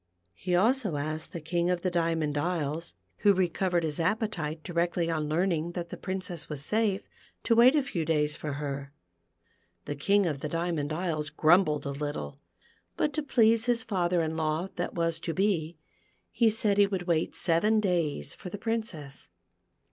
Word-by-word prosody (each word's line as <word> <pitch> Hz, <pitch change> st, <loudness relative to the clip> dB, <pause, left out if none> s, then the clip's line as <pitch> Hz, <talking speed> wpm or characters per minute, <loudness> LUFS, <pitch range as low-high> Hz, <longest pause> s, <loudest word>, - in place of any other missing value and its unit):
He 180 Hz, -, -1 dB
also 220 Hz, -, +2 dB
asked 155 Hz, +2 st, -4 dB
the 170 Hz, -, -5 dB
King 170 Hz, +2 st, -1 dB
of 180 Hz, -1 st, 0 dB
the 185 Hz, -, 0 dB
Diamond 165 Hz, -3 st, 0 dB
Isles, 165 Hz, 0 st, -2 dB, 0.2 s
who 205 Hz, -1 st, +4 dB
recovered 180 Hz, -1 st, +1 dB
his 155 Hz, -1 st, -2 dB
appetite 165 Hz, -4 st, -1 dB
directly 170 Hz, -1 st, 0 dB
on 155 Hz, -2 st, -1 dB
learning 170 Hz, 0 st, 0 dB
that 175 Hz, -1 st, -4 dB
the -, -, -6 dB
Princess 185 Hz, -3 st, -4 dB
was 145 Hz, -2 st, -3 dB
safe, 210 Hz, -1 st, 0 dB, 0.4 s
to 230 Hz, -, +3 dB
wait 240 Hz, +5 st, +7 dB
a 295 Hz, -, +3 dB
few 205 Hz, -12 st, -2 dB
da}'s 150 Hz, -2 st, +1 dB
for 150 Hz, -2 st, -4 dB
her. 140 Hz, -1 st, -4 dB, 0.9 s
The -, -, -3 dB
King 200 Hz, +7 st, +3 dB
of 150 Hz, -5 st, -1 dB
the 150 Hz, -, -4 dB
Diamond 165 Hz, -2 st, -1 dB
Isles 155 Hz, -2 st, -2 dB
grumbled 155 Hz, 0 st, +3 dB
a 140 Hz, -, -2 dB
little, 140 Hz, -, -5 dB, 0.6 s
but 300 Hz, -, +1 dB
to 310 Hz, -, 0 dB
please 230 Hz, -5 st, +3 dB
his 240 Hz, -2 st, +1 dB
father 180 Hz, -4 st, +1 dB
in 160 Hz, 0 st, -2 dB
law 160 Hz, +3 st, -1 dB
that 175 Hz, -, -3 dB
was 165 Hz, -1 st, 0 dB
to 165 Hz, -1 st, -4 dB
be, 175 Hz, -5 st, 0 dB, 0.5 s
he 230 Hz, -2 st, +4 dB
said 210 Hz, -2 st, +1 dB
he 200 Hz, -, +6 dB
would 190 Hz, -3 st, -2 dB
wait 170 Hz, -2 st, 0 dB
seven 210 Hz, +6 st, +3 dB
days 175 Hz, -7 st, -1 dB
for 180 Hz, -, -9 dB
the 205 Hz, -, -6 dB
Princess. 205 Hz, -11 st, -4 dB
170 Hz, 175 wpm, -29 LUFS, 155-195 Hz, 0.9 s, wait